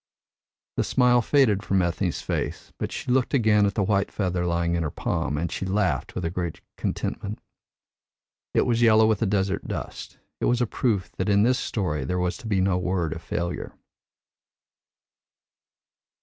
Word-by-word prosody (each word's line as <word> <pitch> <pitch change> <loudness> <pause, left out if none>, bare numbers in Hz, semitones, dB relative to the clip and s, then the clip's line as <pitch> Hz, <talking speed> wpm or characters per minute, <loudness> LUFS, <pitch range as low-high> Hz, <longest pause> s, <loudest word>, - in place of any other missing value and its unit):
The - - +2
smile 125 -1 +4
faded 115 -6 +3
from 95 -3 +1
Ethne's 85 -1 -1
face, - - -3
but - - -3
she - - -3
looked 130 +2 +2
again 105 -4 +4
at 100 - -2
the 105 - +2
white 100 0 +1
feather 90 -3 -1
lying 85 0 0
in 85 - 0
her 75 - -1
palm, 70 0 -2
and 85 +2 -2
she - - -3
laughed 95 -7 0
with 90 - -2
a 80 - -1
great 85 -2 -3 0.2
contentment. 100 +2 -3 1.2
It - - +4
was 120 -1 +1
yellow 110 -1 +6
with 110 -2 +2
the 110 - +1
desert 100 0 0
dust. - - -6 0.2
It - - 0
was 120 0 +2
a 120 - +3
proof 100 -6 -1
that 95 - -1
in 100 0 +4
this 125 +3 +3
story 75 - -2
there 90 +7 -2
was 90 0 0
to 115 - -9
be 100 -3 +1
no 95 -1 +2
word 90 -3 -1
of 80 - -8
failure. 85 0 -3
95 Hz, 175 wpm, -25 LUFS, 90-110 Hz, 1.2 s, yellow